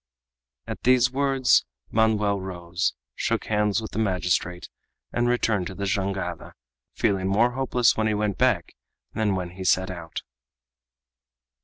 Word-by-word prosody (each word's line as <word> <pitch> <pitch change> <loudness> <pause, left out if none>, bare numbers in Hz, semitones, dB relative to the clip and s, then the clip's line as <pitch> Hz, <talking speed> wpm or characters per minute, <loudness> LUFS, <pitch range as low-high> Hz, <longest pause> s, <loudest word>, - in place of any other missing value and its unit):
At - - -6
these 125 0 +4
words 135 -3 +3 0.3
Manoel 105 -2 +2
rose, 90 -1 -2 0.2
shook - - -1
hands 105 0 +1
with 110 - -7
the - - -3
magistrate, 90 -3 0 0.5
and 120 0 +1
returned 110 -6 +1
to 95 - -8
the 100 - -3
jangada, 95 -3 -2 0.4
feeling 95 -2 +1
more 110 +5 +3
hopeless 125 -1 +2
when 110 0 +1
he 110 - +1
went 105 -2 -1
back - - +2 0.4
than 105 -3 +1
when 90 -2 -3
he 95 +1 -8
set 95 +1 +2
out. 85 -3 -7
100 Hz, 140 wpm, -25 LUFS, 95-110 Hz, 0.5 s, these